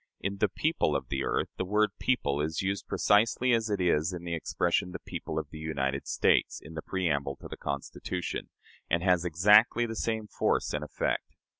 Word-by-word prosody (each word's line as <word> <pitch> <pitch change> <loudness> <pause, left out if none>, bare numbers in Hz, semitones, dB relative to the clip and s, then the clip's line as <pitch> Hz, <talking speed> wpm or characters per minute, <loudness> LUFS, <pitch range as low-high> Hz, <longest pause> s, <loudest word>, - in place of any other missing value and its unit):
In 100 +1 -3
"the 105 - +3
people 155 - 0
of 65 -3 -3
the 70 0 -1
earth," - - 0
the - - -1
word 105 +3 +2
people 75 - +1
is 80 +3 -2
used 100 +1 -2
precisely 115 +4 +3
as 115 -1 +1
it 100 -2 0
is 85 -2 +2
in 85 -1 -6
the 85 -1 -4
expression 85 +2 0
"the - - -5
people 80 - -6
of 80 -2 -3
the 80 - -8
United 70 -3 -2
States" - - +2
in 80 - -12
the 80 - -5
preamble 70 -8 -1
to - - -11
the - - -7
Constitution, 75 +4 -4 0.4
and 85 - +1
has 90 -2 +3
exactly 105 +8 +5
the 115 -1 -5
same 110 -1 -1
force 105 - 0
and - - -2
effect. - - -2
90 Hz, 195 wpm, -29 LUFS, 75-105 Hz, 0.4 s, exactly